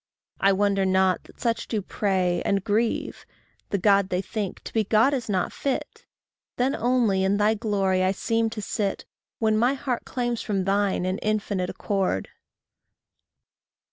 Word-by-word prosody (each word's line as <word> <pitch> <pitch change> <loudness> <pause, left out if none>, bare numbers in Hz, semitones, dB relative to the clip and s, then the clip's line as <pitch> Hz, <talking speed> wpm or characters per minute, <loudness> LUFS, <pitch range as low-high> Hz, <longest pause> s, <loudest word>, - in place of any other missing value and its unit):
I 195 - +4
wonder 195 0 +2
not 190 -1 +2
that - - -18
such 230 -1 -1
do 220 - -1
pray 185 -3 0
and 195 -1 0
grieve 220 +3 -1 0.5
The 200 - 0
God 200 0 +3
they 180 - 0
think, 205 -3 -4
to - - -9
be 220 - +2
God 220 +7 +3
is 245 -5 -3
not 185 -3 0
fit. 275 -2 -4 0.5
Then 255 +3 +1
only 235 -6 +2
in 195 +1 +2
thy 210 +1 +3
glory 200 -4 0
I 185 0 +3
seem 225 +3 0
to 220 -2 -6
sit, 200 -3 -2 0.3
When 220 -1 +2
my 245 +5 +3
heart 255 -3 -3
claims 240 -2 -2
from 195 -3 -1
thine 195 -1 +1
an 185 +2 -1
infinite 205 -4 -1
accord. 190 - -1
205 Hz, 160 wpm, -25 LUFS, 190-225 Hz, 0.5 s, I